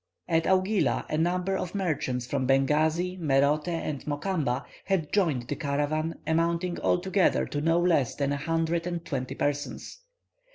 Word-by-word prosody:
At 165 -1 +2
Augila 190 +2 +2
a 155 - +1
number 180 +3 +1
of 185 0 -4
merchants 145 -10 -1
from 130 0 -1
Bengasi, 155 +7 +2
Merote, 145 0 +2
and 165 -5 -3
Mokamba 145 -4 -1 0.2
had 185 -6 -1
joined 160 -12 +2
the - - -2
caravan, 155 +2 -1
amounting 170 +2 0
altogether 190 +1 +2
to 145 - -3
no 165 +2 +3
less 165 -8 +2
than 140 -1 0
a 145 - 0
hundred 165 +3 -1
and 170 -1 -4
twenty 130 -4 -3
persons. 145 - -3
160 Hz, 150 wpm, -27 LUFS, 145-175 Hz, 0.2 s, no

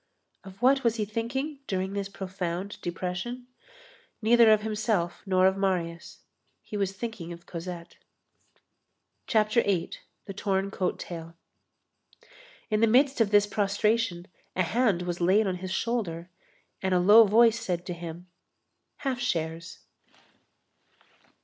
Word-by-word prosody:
Of 190 0 -13
what 270 +1 +4
was 235 -2 +2
he 215 -2 -1
thinking 265 +7 -3
during 190 0 -2
this 200 -1 -3
profound 190 0 -5
depression? 180 +8 -4 0.7
Neither 230 0 +6
of 215 -1 +4
himself 210 -5 -1
nor 185 -1 +3
of 190 0 +4
Marius. 175 -4 -2 0.4
He - - -8
was 195 -2 -1
thinking 195 -5 -6
of 170 0 -10
Cosette. 170 0 -8 1.3
CHAPTER 215 +2 +3
VIII—THE 195 0 -4
TORN 195 -1 -1
COAT 185 -2 -1
TAIL 165 -1 -8 1.4
In 215 - +2
the 230 - +4
midst 265 +3 +3
of 220 - +3
this 205 0 +5
prostration, 205 -2 0 0.3
a 185 - +2
hand 200 -1 +1
was 175 0 -4
laid 195 +5 +4
on 185 -2 -1
his 185 +1 -6
shoulder, 185 -7 -2 0.5
and 190 -1 +1
a - - +4
low 210 +5 +8
voice 230 +2 +5
said 180 -6 -3
to 180 - -4
him: 170 0 -8 0.8
"Half 265 -3 -2
shares." 165 -7 -3
195 Hz, 130 wpm, -27 LUFS, 180-225 Hz, 1.4 s, low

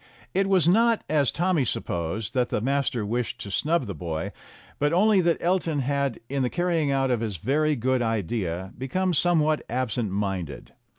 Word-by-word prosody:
It 195 +1 +1
was 185 -5 +4
not, 230 +5 +4
as 145 -3 +2
Tommy 175 -4 +1
supposed, 100 0 -3
that 125 -2 +1
the - - 0
master 130 -2 0
wished 120 +2 -2
to 100 - -6
snub 155 - +1
the 100 - -5
boy, 80 -1 -4 0.5
but 145 +1 +2
only 195 +3 +4
that 170 -1 +2
Elton 170 -4 0
had 140 -1 -1
in 140 +1 -2
the 125 - +1
carrying 170 -3 0
out 135 -1 +1
of 120 - +1
his 110 -4 -3
very 150 - +1
good 130 +1 0
idea 100 -4 -2
become 180 +8 -1
somewhat 155 -2 +2
absent 120 -2 -1
minded. 95 -7 -4
135 Hz, 175 wpm, -25 LUFS, 110-165 Hz, 0.5 s, was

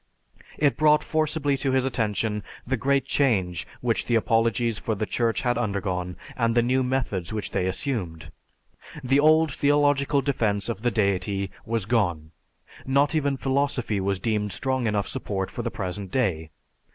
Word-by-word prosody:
It 145 -2 +2
brought 150 0 +4
forcibly 155 -2 0
to 135 0 0
his 130 0 +2
attention 110 -3 -1 0.2
the 130 - 0
great 135 +3 +1
change 95 - +1
which - - +1
the 120 - +2
apologies 115 0 +1
for 110 - -2
the 110 - -2
Church 115 +2 0
had 120 -1 +1
undergone, 95 -5 -2 0.2
and 115 -1 +1
the 120 - +4
new 130 +2 +2
methods 125 -9 -2
which 110 -1 -3
they 90 - 0
assumed. 90 - -3 0.7
The 135 +2 +3
old 155 0 +4
theological 145 -1 +2
defense 110 -7 0
of 110 -3 -4
the 120 - +2
deity 100 -2 0 0.2
was 115 -3 -1
gone; 90 -9 0 0.5
not 140 +3 +2
even 140 -3 +1
philosophy 135 -6 0
was 95 0 0
deemed 105 0 -1
strong 130 +1 -1
enough 105 -2 0
support 95 -2 -3
for - - -4
the 120 - -2
present 95 -2 -4
day. 90 -10 -1
115 Hz, 160 wpm, -25 LUFS, 100-135 Hz, 0.7 s, brought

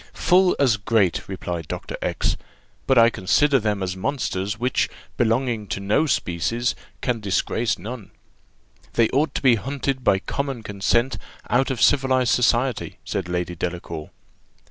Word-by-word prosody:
"Full 180 0 +4
as 130 -5 +3
great," 100 -4 +1
replied 90 -4 -4
Dr. - - -5
X; - - 0 0.5
"but 135 - +4
I 115 0 +7
consider 135 +8 +3
them 105 -3 -1
as 90 0 -2
monsters, 100 -3 -2
which 125 +2 +1 0.3
belonging 115 -2 0
to 100 - -3
no 105 +11 +1
species, 115 - 0 0.3
can 120 -2 -1
disgrace 110 +3 0
none." 110 +3 -8 0.8
"They 115 -2 +3
ought 140 +1 0
to - - -2
be 125 -4 +5
hunted 135 0 -2
by 100 - +4
common 135 +4 -4
consent 115 +5 0 0.3
out 130 +2 +3
of 130 -3 -2
civilized 130 -3 +3
society," 125 0 +1
said 90 -2 -3
Lady 90 0 -2
Delacour. 85 -2 -5
115 Hz, 145 wpm, -23 LUFS, 95-130 Hz, 0.8 s, I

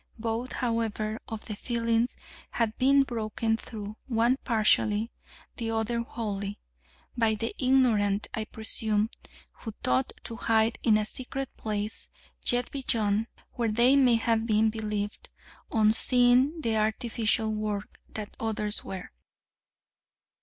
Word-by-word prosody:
Both, 230 +2 -3
however, 225 -2 -1
of 220 -1 -6
the 210 - -5
fillings 230 +1 0 0.4
had 225 -2 0
been 275 +2 +5
broken 225 -2 -1
through, 215 -2 -7
one 240 +1 +2
partially, 220 -1 +3 0.5
the 230 -2 -3
other 225 +1 0
wholly, 205 -3 -4 0.6
by 225 -2 +2
the 225 +2 -3
ignorant, 230 -6 +3
I 220 - -2
presume, 220 0 0 0.5
who 225 -3 -7
thought 125 +1 +1
to 230 - -4
hide 225 0 +2
in 220 -3 +4
a 215 - 0
secret 265 +4 -5
place 210 0 -4 0.4
yet 245 0 +3
beyond, 225 -5 +1 0.3
where 235 -2 0
they 240 +5 +5
may 255 -4 +5
have 225 0 +1
believed, 215 -1 0 0.4
on 215 -1 +4
seeing 250 +6 +4
the 225 -5 0
artificial 220 0 +1
work, 210 -1 -4
that 210 -1 -7
others 215 -2 0
were. 190 -1 -7
225 Hz, 125 wpm, -28 LUFS, 215-235 Hz, 0.6 s, been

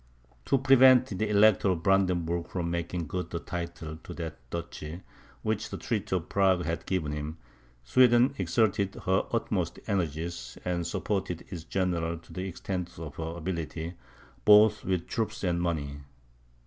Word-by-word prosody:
To 135 - +3
prevent 130 -3 +6
the 110 - 0
Elector 105 -1 +5
of 85 -3 -1
Brandenburg 85 -3 +2
from 85 -2 -3
making 85 0 -2
good 90 +4 -4
the 85 - -3
title 85 -2 -5
to - - -10
that 80 -5 -5
duchy, 85 +1 -6 0.4
which 110 -1 -1
the - - -5
treaty 105 -4 -2
of 90 -2 -2
Prague 95 -3 +2
had 85 0 -3
given 85 -6 -1
him, 75 +2 -4 0.5
Sweden 120 - +5
exerted 100 +1 +1
her 95 +1 +2
utmost - - -1
energies, 80 -8 -3
and 85 -2 -1
supported 95 -2 -2
its 85 -4 -6
generals 85 -3 -1
to - - -14
the 95 +1 -3
extent 90 0 -5
of 75 -3 -8
her 80 +1 -4
ability, 85 -1 -4 0.5
both 105 0 +6
with 90 -3 -1
troops 110 -1 -3
and 85 -2 +1
money. 75 -5 -2
90 Hz, 150 wpm, -29 LUFS, 85-100 Hz, 0.5 s, prevent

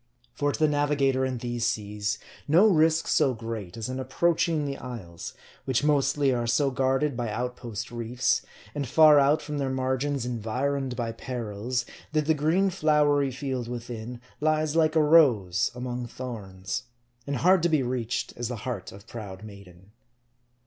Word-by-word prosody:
For 145 +2 0
to - - -4
the 155 - +3
navigator 145 -3 +1
in 130 -1 -1
these 120 0 -3
seas, 105 0 -2 0.3
no 165 +8 +6
risk 160 -5 +4
so 135 -5 +3
great, 115 -4 -6
as 110 - -4
in 130 +1 -4
approach 165 +6 +1
ing 155 -3 0
the 140 -1 -3
isles; 100 -10 -8 0.3
which 130 0 +1
mostly 140 -2 +2
are 120 -1 -1
so 135 +4 +2
guarded 135 +2 +1
by 120 -2 -2
outpost 120 -1 -4
reefs, 120 +1 0 0.3
and 145 -2 -3
far 155 +2 +7
out 140 +2 +3
from 150 -1 -4
their 135 -1 -1
margins 130 0 -1
environed 125 +3 -2
by 120 -2 -2
perils, 120 0 -3 0.3
that 155 -1 +1
the 160 - +3
green 165 +6 +2
flowery 150 -4 +3
field 130 -2 -4
within, 120 0 -6 0.2
lies 155 0 +1
like 160 -1 +3
a 155 - +5
rose 120 - +4
among 125 0 -4
thorns; 110 -2 -6 0.4
and 140 - -1
hard 180 +8 +4
to 170 - +2
be 155 -4 +2
reached 125 -1 -2
as 120 0 -3
the 125 - -4
heart 120 -8 -4
of 100 +2 -13
proud 105 -4 -8
maiden. 100 -2 -13
130 Hz, 165 wpm, -27 LUFS, 115-145 Hz, 0.4 s, far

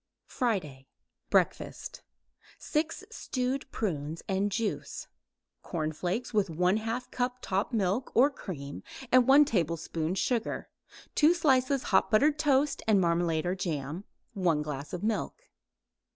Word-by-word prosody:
FRIDAY 155 - -2 0.4
BREAKFAST - - 0 0.6
6 320 +5 -2
stewed 260 - -3
prunes 160 -6 -3
and 195 +2 0
juice; 220 +1 -3 0.6
cornflakes 175 +9 -3
with 205 -2 +2
1/2 215 +9 0
cup 250 0 -1
top 195 -2 -1
milk 215 +2 0
or 270 +5 +6
cream 140 - -7 0.3
and 255 -1 +6
1 285 +2 +8
teaspoon 170 - -1
sugar; 230 +3 -1 0.4
2 320 +3 +5
slices 270 -4 +2
hot - - +4
buttered 290 +7 +3
toast 290 -1 +2
and 210 -3 +5
marmalade 170 -2 +1
or 180 - +1
jam; 160 -2 -3 0.3
1 170 -6 +1
glass 145 -1 -5
milk. 220 - -1
205 Hz, 115 wpm, -29 LUFS, 170-255 Hz, 0.6 s, 1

